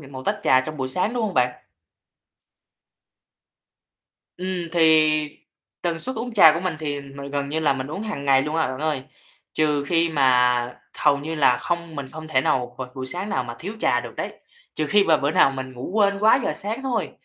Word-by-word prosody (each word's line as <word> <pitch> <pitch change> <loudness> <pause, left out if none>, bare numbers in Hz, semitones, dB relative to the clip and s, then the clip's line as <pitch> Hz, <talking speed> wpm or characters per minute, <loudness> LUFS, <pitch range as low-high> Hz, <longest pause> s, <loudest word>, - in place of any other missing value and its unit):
n 140 -1 -13
một 130 0 -7
tách - - 0
trà 130 - +5
trong 155 +3 -6
buổi 130 -1 -3
sáng, 185 - 0
đúng 240 - -1
hông 205 -4 -3
bạn? 125 0 0 2.7
Ừm, 180 -2 -4
thì 155 -2 +3 0.4
tần 170 -2 -1
suất 260 +8 -4
uống 235 +2 -4
trà 160 -7 +8
của 165 - -2
mình 180 -4 -2
thì 145 -2 -3
m 140 0 -13 0.2
gần 140 0 -2
như 155 +3 -2
là 150 -3 +3
mình 130 0 -4
uống 170 +8 -5
hàng 210 -10 -5
ngày 135 -1 +4
luôn 150 +3 -3
à, 160 - +2
bạn 130 0 -5
ơi, 155 -4 -1 0.5
trừ 150 -2 +1
khi 165 +2 +2
mà 125 -4 +2 0.2
hầu 145 -2 +4
như 160 +3 -5
là 135 -5 +4
không 170 -1 -4
mình 135 -2 -5
không 155 0 -9
thể 130 -4 +2
nào 125 -2 -1
v - - -3
buổi 130 -1 -5
sáng 180 +8 -3
nào 130 -9 -1
mà 120 -1 -7
thiếu 200 +6 -6
trà - - +2
được - - -9
đấy, - - -4 0.4
trừ 155 - -1
khi 205 +4 +4
mà 160 - +4
bữa 145 0 0
nào 135 - +4
mình 130 -1 -6
ngủ 125 +6 -7
quên 200 -2 +2
quá 220 +5 +5
giờ - - 0
sáng 210 - -2
thôi. 265 -2 -2
155 Hz, 220 wpm, -23 LUFS, 135-175 Hz, 2.7 s, trà